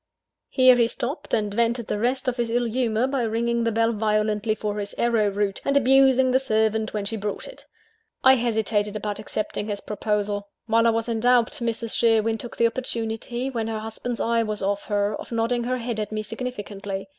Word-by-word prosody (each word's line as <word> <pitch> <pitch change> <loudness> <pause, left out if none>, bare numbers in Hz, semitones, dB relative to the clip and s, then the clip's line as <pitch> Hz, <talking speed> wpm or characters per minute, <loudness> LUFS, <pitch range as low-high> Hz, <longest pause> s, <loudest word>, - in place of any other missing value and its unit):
Here 255 -2 +6
he 235 -1 +4
stopped; 250 +6 -5
and 210 -2 0
vented 235 +1 +1
the 210 - -2
rest 255 +4 0
of 250 0 0
his 235 -1 -1
ill 240 +1 +1
humour 235 0 0
by 270 -1 -1
ringing 235 +1 0
the 230 - +1
bell 230 +1 +2
violently 215 0 0
for 210 -1 -3
"his 205 0 -6
arrow 230 -3 +2
root," 200 0 -1
and 275 0 +2
abusing 265 -1 +5
the 260 - +4
servant 220 -3 +1
when 210 -2 -3
she 225 - -3
brought 205 -1 -4
it. - - -13 0.6
I 265 - +8
hesitated 220 -4 0
about 210 0 -3
accepting 215 0 -4
his 205 -2 -3
proposal. 205 -1 -2 0.2
While 230 0 +3
I - - +6
was 225 0 0
in 230 -1 -1
doubt, 245 0 +3
Mrs. 230 -1 -1
Sherwin 225 -1 +2
took 240 - -7
the 235 - +3
opportunity, 235 +1 -2
when 230 -3 -2
her 225 -1 -2
husband's 225 +2 -4
eye 230 0 +2
was 215 -3 -3
off 200 +1 -1
her, 205 0 0
of - - -10
nodding 235 +1 0
her 255 +1 0
head 235 -2 -4
at 210 0 -3
me 215 0 -2
significantly. 205 -4 -5
225 Hz, 205 wpm, -24 LUFS, 210-240 Hz, 0.6 s, I